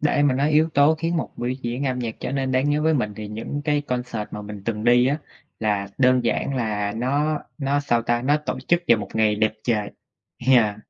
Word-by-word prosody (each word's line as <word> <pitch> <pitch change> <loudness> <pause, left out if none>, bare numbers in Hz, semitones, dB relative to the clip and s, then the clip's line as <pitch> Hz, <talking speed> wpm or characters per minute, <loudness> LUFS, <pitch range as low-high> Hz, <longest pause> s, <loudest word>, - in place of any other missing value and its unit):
để 145 -1 +2
mà 145 -3 +3
nói 140 +3 +1
yếu 155 +2 +4
tố 145 +3 +5
khiến 165 +2 -2
một - - -2
biểu 120 +1 -2
diễn 130 +1 -3
âm 130 -1 -1
nhạc 115 -3 -3
trở 125 - -3
nên 135 -1 -1
đáng 130 +3 +2
nhớ 150 +1 +1
với 160 0 +3
mình, 105 -7 -1
thì 105 -1 -6
những 115 +7 -5
cái 150 -1 +2
concert 125 -5 -3
mà 105 - -6
mình 105 -1 -8
từng 110 -1 -3
đi 120 +1 +5
á, 145 +3 +1 0.4
là 105 -2 0
đơn 130 -1 +4
giản 135 +3 0
là 105 -3 -1
nó 145 +6 0 0.2
nó 140 0 0
sao 120 -5 +1
ta? 120 +1 0
Nó 145 +3 +3
tổ 150 -3 -4
chức 175 0 +3
vào 120 - +6
một 105 - -6
ngày 110 -1 +3
đẹp 110 0 +2
trời. 105 -4 0 0.6
Yeah. 115 -6 +4
125 Hz, 235 wpm, -23 LUFS, 110-145 Hz, 0.6 s, vào